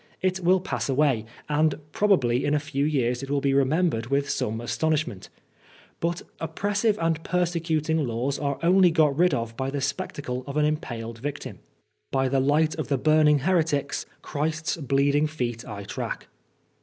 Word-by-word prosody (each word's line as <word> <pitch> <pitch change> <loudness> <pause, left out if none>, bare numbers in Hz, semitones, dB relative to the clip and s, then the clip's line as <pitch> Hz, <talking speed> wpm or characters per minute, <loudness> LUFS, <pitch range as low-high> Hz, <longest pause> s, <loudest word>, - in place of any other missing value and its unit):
It 185 0 0
wUl 185 +1 +4
pass 125 - -3
away, 135 -5 +2 0.2
and 150 0 +2 0.2
probably 135 - +2
in 145 - +2
a 150 - +1
lew 140 +1 +1
years 125 -5 +1
it 135 - -7
will 145 0 +1
be 140 0 +1
remembered 140 -2 +2
with 140 +2 0
some 110 +1 -1
astonidmient; 150 -3 -1 0.7
but 170 +1 -2 0.2
oppressive 205 +6 0
and 165 -1 0
^rsecuting 160 -4 0
laws 120 +4 -2
are 140 -2 -1
only 180 +1 +6
got 155 -4 +3
rid 175 -1 +3
of 115 -1 -4
by 130 +3 -2
the 140 +1 -3
spectacle 140 -2 -3
of 140 +1 -4
an 150 - +3
unpaled 115 -7 -3
victim. 130 - -5 0.5
*Bv 135 -1 +1
the 135 - +3
light 150 +4 +2
of 145 -4 -1
burning 155 -1 +5
heretics 160 -4 0 0.2
Christ's 155 +2 -2
bleeding 140 +1 +2
feet 125 -6 -3
I 100 -2 -6
tract.' 100 - -5
145 Hz, 160 wpm, -25 LUFS, 130-160 Hz, 0.7 s, only